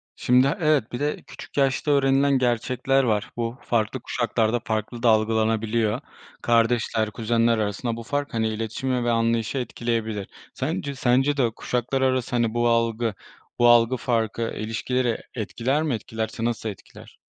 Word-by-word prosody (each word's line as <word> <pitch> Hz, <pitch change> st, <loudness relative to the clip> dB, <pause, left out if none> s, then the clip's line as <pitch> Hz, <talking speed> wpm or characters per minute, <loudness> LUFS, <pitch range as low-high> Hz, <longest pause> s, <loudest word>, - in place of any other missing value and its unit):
Şimdi 125 Hz, +2 st, +4 dB
a 165 Hz, -, -2 dB
evet, 150 Hz, -7 st, +2 dB
bir 120 Hz, -, -4 dB
de 145 Hz, +1 st, -1 dB
küçük -, -, -11 dB
yaşta 135 Hz, +2 st, +2 dB
öğrenilen 140 Hz, 0 st, +3 dB
gerçekler 130 Hz, +2 st, +1 dB
var. 105 Hz, -4 st, 0 dB
Bu 115 Hz, +1 st, -3 dB
farklı 115 Hz, +2 st, -1 dB
kuşaklarda 115 Hz, -1 st, 0 dB
farklı 110 Hz, +2 st, -3 dB
da 120 Hz, -, +5 dB
algılanabiliyor. 110 Hz, +1 st, +1 dB, 0.4 s
Kardeşler, 115 Hz, -2 st, +2 dB
kuzenler 115 Hz, +1 st, +1 dB
arasında 110 Hz, +3 st, -2 dB
bu 115 Hz, -, -6 dB
fark, 145 Hz, +3 st, -3 dB
hani, 110 Hz, -1 st, +1 dB
iletişimi 115 Hz, +3 st, -2 dB
ve 120 Hz, -, +1 dB
anlayışı 115 Hz, +2 st, 0 dB
etkileyebilir. 115 Hz, -5 st, -2 dB, 0.3 s
Sence 140 Hz, +9 st, -3 dB
sence 135 Hz, +3 st, +2 dB
de 135 Hz, -, +3 dB
o 115 Hz, -, +1 dB
kuşaklar 125 Hz, +2 st, -2 dB
arası, 130 Hz, -2 st, +1 dB
hani, 115 Hz, -2 st, +1 dB
bu 120 Hz, 0 st, +1 dB
algı 115 Hz, -1 st, +1 dB, 0.5 s
bu 120 Hz, -, +6 dB
algı 120 Hz, +1 st, +5 dB
farkı, 115 Hz, -2 st, -1 dB
e 115 Hz, -, -3 dB
ilişkileri 120 Hz, +2 st, -1 dB, 0.2 s
etkiler 125 Hz, +6 st, -1 dB
mi? 150 Hz, -4 st, 0 dB
Etkilerse 110 Hz, 0 st, -4 dB
nasıl 115 Hz, -1 st, -2 dB
etkiler? 100 Hz, -, -12 dB
120 Hz, 155 wpm, -24 LUFS, 110-130 Hz, 0.5 s, bu